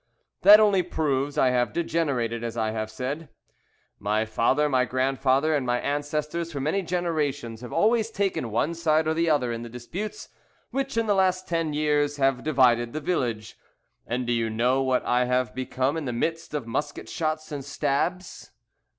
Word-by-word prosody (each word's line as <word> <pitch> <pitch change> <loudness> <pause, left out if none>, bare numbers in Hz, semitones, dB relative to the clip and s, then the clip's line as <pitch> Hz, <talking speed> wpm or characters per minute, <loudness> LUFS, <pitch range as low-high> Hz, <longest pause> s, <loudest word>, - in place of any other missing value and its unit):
"That 205 +2 +9
only 205 -3 +4
proves 145 -5 -1
I 130 - +4
have 125 -1 +1
degenerated, 140 -9 -1
as 115 0 -4
I 110 -1 0
have 110 0 -3
said. 140 +7 -5 0.7
My 105 +2 0
father, 125 +7 +2
my 130 -3 +2
grandfather, 135 +3 +1
and 145 -3 +1
my 125 -1 0
ancestors 150 +4 -2
for 145 - -4
many 155 +8 0
generations 150 - -2
have 125 - -8
always 225 0 +2
taken 195 - -1
one 120 +9 0
side 160 -1 +1
or 160 - +2
the 165 +1 +1
other 135 -6 +2
in 115 0 -4
the 120 - -7
disputes 145 - -6 0.4
which 275 -2 -2
in 230 - +2
the 210 - +2
last 185 -1 +1
ten 165 -3 -1
years 145 -1 +1
have 135 -2 +1
divided 120 -5 +3
the 155 - -2
village. 120 -10 -2 0.5
And 125 +1 -2
do 120 - 0
you 115 -1 0
know 125 +4 +1
what 130 -1 +1
I 125 +1 +2
have 125 -3 0
become 130 +2 -1
in 160 - -4
the 125 - -2
midst 165 +6 -2
of 145 -6 -3
musket 145 +5 -4
shots 155 -1 -3
and 145 -2 -4
stabs? 150 +6 -2
140 Hz, 180 wpm, -26 LUFS, 125-165 Hz, 0.7 s, That